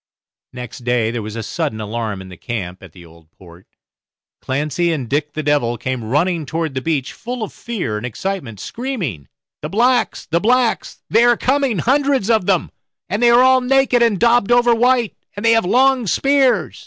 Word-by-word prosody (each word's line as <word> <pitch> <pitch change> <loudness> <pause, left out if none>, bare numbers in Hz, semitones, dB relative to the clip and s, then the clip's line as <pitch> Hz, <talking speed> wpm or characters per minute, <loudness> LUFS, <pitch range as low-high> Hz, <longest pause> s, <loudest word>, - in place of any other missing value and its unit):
Next 125 -1 -8
day 120 -2 0
there 120 -1 -3
was 105 +1 -7
a 115 - -4
sudden 150 -8 -3
alarm 110 -2 -4
in 95 - -12
the 90 - -10
camp 95 -3 -6
at 95 -4 -13
the 85 +1 -15
Old 80 -1 -19
Port. 85 -1 -16 0.7
Clancy 150 +6 -1
and 140 -7 -3
Dick 145 +4 -2
the 155 - -4
Devil 140 -5 +1
came 130 0 -4
running 155 +6 0
toward 160 -2 -3
the 130 - -3
beach, 145 -2 -2
full 245 0 -5
of 215 - -6
fear 185 - -4
and 105 - -7
excitement, 130 - -5
screaming, 180 - -5 0.3
"The 150 - -5
blacks, 240 +6 +1
the 165 +1 0
blacks, 245 +3 0
they 225 +2 +5
are 240 -1 +4
coming, 265 -4 +1
hundreds 265 - +1
of 220 -5 +1
them, 190 -4 +1 0.4
and 205 +5 -2
they 240 - +5
are 240 +1 +6
all 260 0 +5
naked, 260 -1 +2
and 225 -5 +2
daubed 235 -1 +3
over 240 0 +4
white, 245 -1 +2 0.2
and 205 +3 -5
they 230 - +5
have 225 -4 +3
long 255 +2 +3
spears." 245 - +1
175 Hz, 190 wpm, -18 LUFS, -, 0.7 s, are